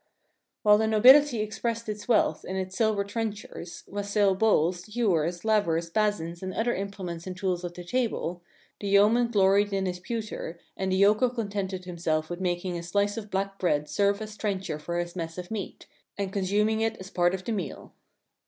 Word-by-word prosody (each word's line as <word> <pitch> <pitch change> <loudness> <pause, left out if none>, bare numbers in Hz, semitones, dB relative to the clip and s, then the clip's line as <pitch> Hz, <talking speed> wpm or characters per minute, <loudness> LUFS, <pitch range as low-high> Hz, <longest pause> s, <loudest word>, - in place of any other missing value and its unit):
While 210 -1 +6
the 220 - +2
nobility 250 +3 +6
expressed 230 +2 -3
its 210 -1 -5
wealth 235 - +2
in 190 - -5
its 185 0 -3
sil 220 -1 +3
ver 200 - 0
trenchers, 205 -4 -5
wassail 200 0 +1
bowls, 185 0 +1
ewers, 175 -6 +1
layers, 170 -7 +1
basins 175 -4 0
and 185 0 -5
other 240 +2 +1
implements 190 -3 -5
and 185 0 -5
tools 185 -2 -1
of 175 -1 -5
the 180 - -7
table, 180 -5 -2 0.4
the 200 - -4
Yeoman 210 +5 +5
gloried 205 -2 +3
in 195 -1 0
his 180 -1 -3
pewter 215 -5 -5 0.2
and 190 0 -2
the - - +2
Yokel 210 +6 +4
con 230 -4 -4
tented 190 -2 -3
himself 165 -2 -2
with 175 +1 -5
making 180 0 -1
his 170 0 -5
slice 205 +3 +1
of 215 -2 -6
black 195 0 -2
bread 150 -5 +1
serve 200 +7 +1
as 215 -1 -8
trencher 190 -7 -2
for 170 +3 -4
his 175 0 -3
mess 165 -1 -5
of 180 +2 -7
meat, 210 -4 -5 0.3
and 195 -1 -3
consum 205 +2 +1
ing 220 0 0
it 225 0 0
as 190 +1 -10
part 175 +1 +2
of 190 - -7
the - - -2
meal. 195 -6 -5
195 Hz, 195 wpm, -27 LUFS, 175-215 Hz, 0.4 s, While